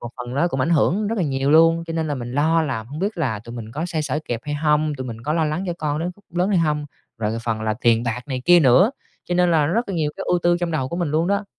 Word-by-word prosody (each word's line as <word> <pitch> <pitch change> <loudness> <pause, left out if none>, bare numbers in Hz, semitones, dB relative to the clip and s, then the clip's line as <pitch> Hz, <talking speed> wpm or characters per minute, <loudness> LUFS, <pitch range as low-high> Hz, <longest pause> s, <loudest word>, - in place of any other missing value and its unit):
một 120 - -6
phần 125 0 -6
nó 170 +6 +2
cũng 135 -5 -2
ảnh 130 - +1
hưởng 180 +6 +2
rất 225 0 -2
là 185 - +1
nhiều 135 -1 0
luôn, 165 +2 +5
cho 165 - -4
nên 160 -1 -1
là 145 - -1
mình 120 -2 -6
lo 160 +4 +2
là 130 -7 -2
hông 135 +7 -9
biết 200 +4 -2
là 125 -10 -1
tụi 115 +3 -10
mình 115 -2 -8
có 155 +6 -3
xoay 165 -3 -2
sở 150 0 -2
kịp 115 -1 -3
hay 145 - -4
hông, 150 0 +1
tụi 130 -2 -6
mình 115 -2 -7
có 150 - -1
lo 160 0 +1
lắng 155 +5 -2
cho 175 - -1
con 150 -1 -1
đến 170 +3 -2
khúc 205 - -23
lớn 175 +2 0
hay 200 -3 +2
hông, 150 -2 0 0.3
rồi 110 +1 -1
phần 115 -2 -1
là 110 0 0
tiền 115 -1 +3
bạc 120 0 -2
này 130 -2 -3
kia 175 0 +7
nữa, 150 - +5 0.3
cho 175 - -2
nên 180 0 +3
là 155 -3 +3
rất 225 +10 0
là 195 - -3
nhiều 155 -3 0
cái - - -5
ưu 180 - +2
tư 175 0 +3
trong 175 -1 -1
đầu 140 -5 -1
của 170 - -4
mình 175 -4 -1
luôn 160 +3 +1
đó. 200 +1 0
150 Hz, 320 wpm, -22 LUFS, 130-170 Hz, 0.3 s, kia